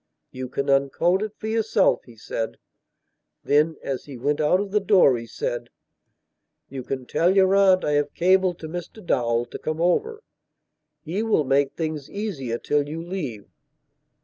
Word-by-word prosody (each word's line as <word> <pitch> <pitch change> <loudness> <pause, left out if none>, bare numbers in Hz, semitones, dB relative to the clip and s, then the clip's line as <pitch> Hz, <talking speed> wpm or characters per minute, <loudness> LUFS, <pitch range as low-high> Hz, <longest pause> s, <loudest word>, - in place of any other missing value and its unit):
"You 130 0 -6
can 140 +2 -3
uncode 140 +7 +2
it 215 -1 -3
for - - -9
yourself," 220 -2 +2
he 120 - -15
said. 110 0 -4 0.9
Then, 150 +2 +2
as 135 -2 -4
he 140 -3 -9
went 145 +5 0
out 155 +5 +3
of 200 -1 -3
the 210 - +3
door, 190 -9 +5
he 115 -1 -6
said: - - -4 1.0
"You 135 - -6
can 130 0 -5
tell 175 +8 +2
your 190 -1 +5
aunt 190 -2 +4
I 150 - +1
have 145 0 0
cabled 185 0 +3
to 160 - -5
Mr 175 +5 -8
Dowell 120 -5 +1
to - - -9
come 155 0 -3
over. 430 - 0 0.8
He 175 +7 -2
will 220 -8 +2
make 135 0 +1
things 155 -4 -4
easier 150 - -3
till 145 +3 0
you 160 +2 -5
leave." 150 - -5
160 Hz, 170 wpm, -24 LUFS, 135-190 Hz, 1.0 s, door